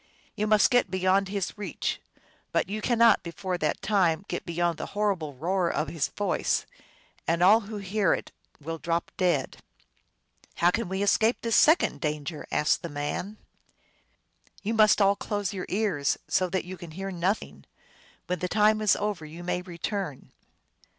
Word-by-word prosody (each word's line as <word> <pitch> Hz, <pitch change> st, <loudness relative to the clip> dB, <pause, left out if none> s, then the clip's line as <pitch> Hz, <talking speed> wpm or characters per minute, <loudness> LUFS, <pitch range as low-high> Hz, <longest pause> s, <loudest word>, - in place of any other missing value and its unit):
You 210 Hz, -, -1 dB
may 215 Hz, 0 st, +5 dB
get 245 Hz, -5 st, +2 dB
beyond 190 Hz, +1 st, +2 dB
his 195 Hz, -1 st, -3 dB
reach, 195 Hz, -7 st, -3 dB, 0.5 s
but -, -, +1 dB
you 210 Hz, +3 st, -4 dB
cannot 230 Hz, -2 st, +4 dB
before 180 Hz, +1 st, -4 dB
that 150 Hz, -2 st, -1 dB
time 190 Hz, -3 st, +2 dB
get -, -, -5 dB
beyond 170 Hz, -1 st, -1 dB
the -, -, -4 dB
horrible 185 Hz, -9 st, 0 dB
roar 175 Hz, +5 st, 0 dB
of 155 Hz, -, -1 dB
his 165 Hz, -4 st, -1 dB
voice. 205 Hz, -2 st, -1 dB, 0.6 s
And 170 Hz, +2 st, +2 dB
all 210 Hz, +5 st, +7 dB
who 215 Hz, -1 st, -7 dB
hear 200 Hz, -1 st, 0 dB
it -, -, -8 dB, 0.3 s
will 165 Hz, +2 st, -5 dB
drop 170 Hz, +1 st, -2 dB
dead." 175 Hz, -8 st, 0 dB, 0.5 s
" -, -, -34 dB
How 175 Hz, +1 st, +3 dB
can 230 Hz, -1 st, -2 dB
we 190 Hz, +1 st, -1 dB
escape 220 Hz, +3 st, +2 dB
this 230 Hz, -1 st, +1 dB
second 315 Hz, +3 st, +4 dB
danger? 150 Hz, 0 st, -3 dB
" -, -, -28 dB
asked 150 Hz, 0 st, +2 dB
the 170 Hz, -, -5 dB
man. 145 Hz, +8 st, -4 dB, 0.6 s
" -, -, -32 dB
You 215 Hz, +3 st, -1 dB
must 215 Hz, -1 st, +5 dB
all 200 Hz, +1 st, +4 dB
close 205 Hz, -2 st, -3 dB
your 185 Hz, -2 st, -5 dB
ears, 190 Hz, -9 st, 0 dB
so 185 Hz, +4 st, +1 dB
that 190 Hz, 0 st, -2 dB
you 185 Hz, +1 st, -7 dB
can 175 Hz, -, -9 dB
hear 195 Hz, 0 st, -4 dB
nothing. 185 Hz, +3 st, -2 dB, 0.6 s
When 180 Hz, -1 st, -2 dB
the 180 Hz, -, -2 dB
time 215 Hz, +1 st, +3 dB
is 210 Hz, -3 st, +4 dB
over 205 Hz, -5 st, -2 dB
you 160 Hz, +3 st, -9 dB
may 180 Hz, 0 st, -1 dB
return." 180 Hz, -3 st, -5 dB
185 Hz, 175 wpm, -27 LUFS, 170-205 Hz, 0.6 s, all